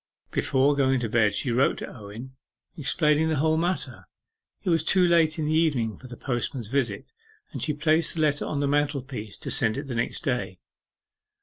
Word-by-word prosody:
Before 140 +2 +2
going 135 -2 +2
to 115 - -1
bed 105 -2 +2
she 125 - -1
wrote 125 +4 +2
to - - -7
Owen 115 +4 -10 0.4
explaining 150 +2 +2
the 160 - +1
whole 155 +3 +2
matter. 175 +3 -2 0.6
It 185 - 0
was 165 -2 +2
too 180 +2 +4
late 165 -1 +3
in 155 - -1
the 155 - 0
evening 140 -10 +1
for 130 - -13
the 120 -1 -10
postman's 120 -3 -3
visit, 125 -5 -1 0.5
and - - -6
she 150 - -1
placed 155 +2 +2
the 160 - -1
letter 145 -2 +1
on 145 - -2
the 140 - +1
mantelpiece 140 -6 -2
to - - -6
send 110 +1 +3
it 140 - -3
the 135 -4 -6
next 115 0 -2
day. 125 - -2
140 Hz, 195 wpm, -26 LUFS, 120-155 Hz, 0.6 s, too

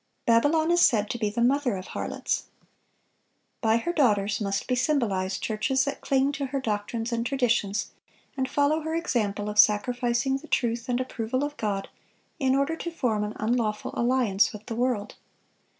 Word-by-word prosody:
Babylon 290 +8 +3
is 345 0 +4
said 210 -4 +3
to 240 - -4
be 215 -2 0
"the 235 +3 -1
mother 260 -2 +2
of 185 - -7
harlots." - - -3 1.2
By 225 0 +3
her 345 +9 -2
daughters 210 - +2
must 195 -1 -1
be 255 - 0
symbolized 230 -8 0
churches 260 +5 +1
that 280 - -4
cling 270 +1 +2
to 280 -1 -3
her 275 +1 -2
doctrines 225 0 -3
and 230 0 0
traditions, 235 -6 0 0.4
and 265 -1 -1
follow 290 +2 +2
her 320 +1 -3
example 210 -11 -1
of 210 0 -2
sacrificing 240 +5 +3
the 305 +3 -13
truth 235 -3 -1
and 245 - +1
the 255 - 0
approval 255 +1 -3
of 290 0 -3
God, 205 -6 -2 0.5
in 265 -1 +2
order 280 +4 +1
to 340 - -4
form 235 -10 -1
an 210 0 -4
unlawful 215 -1 -1
alliance 235 -5 +2
with 210 -1 -10
the 230 - -5
world. 240 -4 -1
240 Hz, 175 wpm, -26 LUFS, 210-270 Hz, 1.2 s, is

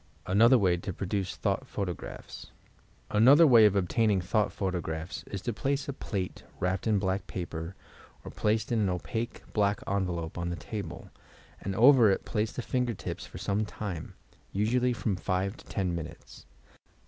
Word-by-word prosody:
ANOTHER 115 +7 +6
WAT 90 -5 +2
TO 95 - -4
PRODUCE 95 +1 -2
THOUGH - - 0
T - - -16
PUOTOQKAPHS 90 -4 -5 0.6
Another 135 +10 +7
way 120 -7 +8
of 100 - 0
obtaining 100 +2 +2
thought 105 +3 +1
photographs 90 -3 -3
is 100 -2 -5
to 120 - -2
place 140 +6 -1
a 140 - -3
plate 95 -7 -4 0.2
wrapped 90 +3 -1
in 110 -2 +3
black 95 0 -1
paper, 85 0 -5 0.5
or - - -7
placed 110 +5 0
in 115 - +2
an 100 -3 +2
opaque 110 +6 -3
black 105 -1 +2
envelope, 90 -4 -2
on 85 0 -2
the 85 - -2
table, 105 +4 -7 0.5
and 95 0 -3
over 120 0 +7
it 95 - 0
place 110 -1 -1
the 125 - -5
finger 125 -2 -1
tips - - -6
for - - -10
some 100 +2 0
time, 105 -5 -6 0.2
— - - -32
usually 120 +5 +2
from 115 -4 -1
5 95 +4 -1
to - - -15
10 95 -4 -1
minutes. 85 -2 -8
100 Hz, 170 wpm, -29 LUFS, 90-115 Hz, 0.6 s, way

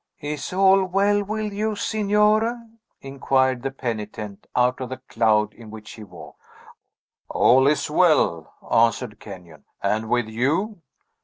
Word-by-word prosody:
"Is 150 -1 -5
all 195 +1 +4
well 200 +2 +1
with 215 0 -4
you, 215 +1 -2
Signore?" 210 +2 +1 0.5
inquired 130 -2 0
the 135 - -2
penitent, 110 -5 -6
out 125 +1 +1
of 125 - -5
the 130 - -6
cloud 110 -4 0
in 115 -2 -14
which 105 -1 -11
he 110 - -11
walked. 100 - -14 0.9
"All 130 +2 +4
is 150 +1 +1
well," 150 - +2 0.2
answered 115 -1 +1
Kenyon. 90 -5 -12
"And 110 +2 -1
with 120 -2 +1
you?" 155 - -1
130 Hz, 135 wpm, -22 LUFS, -, 0.9 s, all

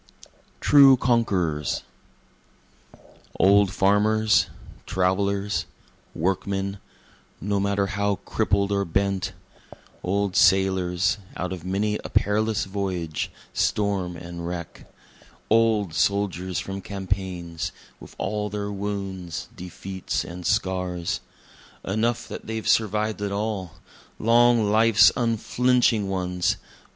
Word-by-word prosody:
True 140 -2 +7
Conquerors 95 - 0 1.6
Old 100 +1 +5
farmers, 105 +3 +3 0.4
travelers, 100 +2 0 0.5
workmen 95 +3 -1 0.6
(no 100 +1 -1
matter 100 0 +1
how 100 +1 0
crippled 100 +1 0
or 100 0 +1
bent,) 95 +1 -1 0.7
Old 100 +1 -1
sailors, 95 0 +3 0.2
out 90 0 -3
of 90 -3 -8
many 100 +3 -1
a - - -6
perilous 110 0 +1
voyage, 95 -5 -3 0.2
storm 95 -4 0
and 85 0 -7
wreck, 85 -2 -7 0.6
Old 110 -5 +3
soldiers 95 +1 0
from 95 0 -4
campaigns, 95 -4 -4 0.3
with - - -13
all 105 +1 -2
their 105 0 -4
wounds, 95 -4 -5
defeats 95 +1 -4
and 85 0 -6
scars; 90 -3 -1 0.7
Enough 110 +4 0
that - - -8
they've 110 0 -4
survived 105 -1 +1
at 100 -1 -2
all 100 -4 -3 0.4
long 115 -1 +4
life's 110 0 +6
unflinching 120 -2 +2
ones! 90 -2 0
100 Hz, 100 wpm, -24 LUFS, 90-105 Hz, 1.6 s, True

